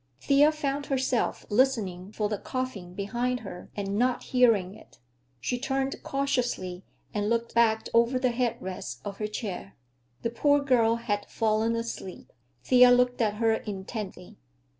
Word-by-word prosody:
Thea 285 - +5
found 285 -2 -3
herself 260 -3 0
listening 205 -6 +1
for 215 -1 -1
the 210 -1 -3
coughing 220 -9 -5
behind 240 +5 -1
her 185 -4 -9
and 200 0 -2
not 250 0 +1
hearing 225 -7 +3
it. - - -17 0.4
She 245 - -2
turned 270 +1 -2
cautiously 245 -10 -1 0.3
and 210 0 0
looked 235 0 0
back 225 -1 +3
over 235 +2 +4
the 255 -1 +1
head 235 -1 -1
rest 180 -10 -6
of 200 -1 -5
her 210 - -1
chair. 200 -3 -5 0.5
The 230 - -1
poor 285 +4 +3
girl 245 -5 +3
had 205 -3 -2
fallen 220 +1 +1
asleep. 230 -5 -6 0.3
Thea 250 -1 +7
looked 245 0 +3
at 210 -2 +1
her 225 +1 +2
intently. 195 - -6
230 Hz, 150 wpm, -28 LUFS, 205-250 Hz, 0.5 s, Thea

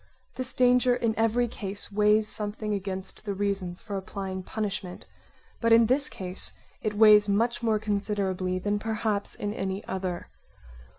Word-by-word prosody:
This 255 0 -5
danger 250 0 +4
in 230 -2 0
every 225 +2 +2
case 200 -3 -5
weighs 210 +1 +3
something 210 0 0
against 190 -1 -5
the 200 -2 -3
reasons 195 -3 -2
for 205 -3 -5
applying 190 0 -5
punishment, 195 -2 -4 0.5
but 230 -1 +1
in 230 0 +7
this 260 +4 +3
case 185 0 -2 0.3
it 210 -1 -2
weighs 210 -1 +7
much 230 +4 +1
more 225 -2 +2
considerably 200 -3 -1
than 205 +2 -1
perhaps 215 -1 -2
in 205 0 -3
any 195 -1 -3
other. 185 -2 -4
205 Hz, 145 wpm, -27 LUFS, 195-225 Hz, 0.5 s, in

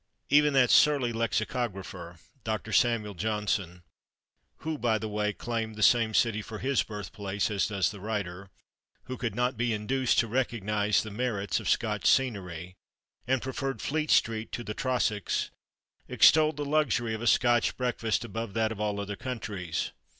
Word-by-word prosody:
Even 150 0 +5
that 130 -3 +4
surly 140 -6 +4
lexicographer, 100 -6 -3 0.3
Doctor 110 0 -3
Samuel 110 -2 +2
Johnson 100 -3 -2 0.8
(who, 155 -1 -3
by 115 -2 +2
the 110 - -4
way, 105 0 -1
claimed 115 0 -4
the 110 - -2
same 115 0 +4
city 110 -3 +2
for 110 +1 -8
his 135 +4 +1
birthplace 105 0 -4
as 100 -2 +1
does 100 -3 0
the 105 - -10
writer), 100 -2 -4 0.5
who 130 - -6
could 115 -5 -3
not 125 +1 0
be 120 0 0
induced 125 +4 0
to 115 - +3
recognise 105 -4 0
the 110 - -7
merits 105 -4 -1
of - - -3
Scotch - - +1
scenery, 90 -9 0 0.5
and 130 -1 +1
preferred 135 -2 -3
Fleet 155 +5 -2
Street 110 -1 +2
to 120 - -4
the 105 - -5
Trossachs, 115 -5 -1 0.6
extolled 155 -1 +5
the 145 - -3
luxury 140 -6 +1
of 110 - -4
a 120 - -2
Scotch 120 -1 +3
breakfast 120 -2 -1
above 115 -1 -5
that 110 -1 +1
of 105 -2 -5
all 105 -1 -1
other 100 0 -4
countries. 100 -9 -4
110 Hz, 160 wpm, -28 LUFS, 105-125 Hz, 0.8 s, Even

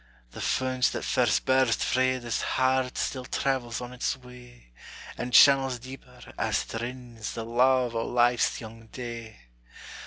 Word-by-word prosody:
The - - -8
fount 130 -1 0
that - - -4
first 120 -4 +1
burst 130 -3 +2
frae 130 0 +1
this 120 -2 -3
heart 130 0 0
Still 130 -2 -2
travels 125 -3 -2
on 125 0 -7
its 125 +2 -2
way; 125 - -16 0.4
And 125 +1 -5
channels 135 +1 +6
deeper, 130 +2 -12 0.2
as - - 0
it 115 - -3
rins, 120 -2 -6
The 115 - -5
luve 125 +1 +2
o' 115 0 -2
life's 120 0 +2
young 115 0 -11
day. 115 - -8
125 Hz, 150 wpm, -27 LUFS, 115-130 Hz, 0.4 s, channels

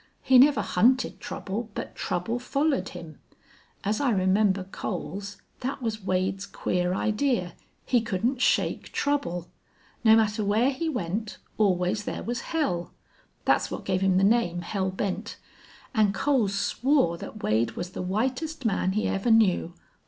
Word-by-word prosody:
He 260 -1 +6
never 265 -5 +5
hunted 240 +8 +2
trouble, 215 +4 -5
but - - -5
trouble 185 +7 -2
follered 275 -5 0
him. 155 -3 -10 0.6
As 210 +6 0
I 280 - +2
remember 195 -1 +2
Coles, 195 +1 -5 0.2
thet 265 +2 -3
was 220 -4 -3
Wade's 190 +1 -1
queer 180 -2 -1
idee 215 -3 0 0.4
he 245 -2 +3
couldn't 235 +4 -1
shake - - +1
trouble. 180 - -1 0.6
No 220 -1 +7
matter 215 -1 +2
whar 220 +6 +2
he 320 +4 -2
went, 210 - -3 0.2
always 190 0 +2
thar - - -5
was 240 0 -3
hell. 185 - -1 0.5
Thet's - - +2
what - - -6
gave 185 -1 0
him 190 -1 +3
the 190 - +3
name 195 -5 +2
Hell 190 +1 -1
Bent.... 195 +3 -3 0.6
An' 215 -4 +3
Coles 225 -5 +1
swore 245 - +2
thet 215 - -9
Wade 110 +2 +1
was 175 +1 -5
the - - -5
whitest 255 - -2
man 190 -3 +1
he 215 - 0
ever 195 +5 -1
knew. 195 -6 +3
210 Hz, 150 wpm, -26 LUFS, 185-240 Hz, 0.6 s, No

